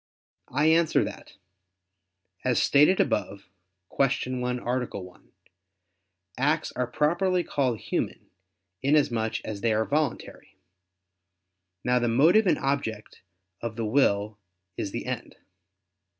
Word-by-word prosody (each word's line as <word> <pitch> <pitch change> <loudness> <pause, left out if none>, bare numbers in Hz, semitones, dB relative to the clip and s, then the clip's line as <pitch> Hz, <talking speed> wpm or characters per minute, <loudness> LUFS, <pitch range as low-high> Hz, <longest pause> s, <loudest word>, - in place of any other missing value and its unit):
I 145 +4 +1
answer 160 0 +4
that, - - -8 1.1
As 125 -2 +2
stated 150 +7 +4
above 100 -1 -1 0.5
(Q. 130 -1 0
1, 125 0 -2
A. 125 +1 -1
1), 90 -1 -14 1.1
acts 150 +4 +1
are 125 0 -2
properly 175 +8 +1
called 130 -8 0
human, - - -4 0.5
inasmuch 130 -6 +1
as 105 -2 -5
they 115 - +2
are 110 +1 +1
voluntary. 145 -9 -3 1.3
Now, 125 0 +2
the 120 - 0
motive 160 - +4
and - - +3
object 135 -6 -3 0.4
of 115 -2 -4
the 115 -1 -3
will 105 -4 +1 0.4
is - - -3
the - - -5
end. - - -5
125 Hz, 115 wpm, -26 LUFS, 110-150 Hz, 1.3 s, answer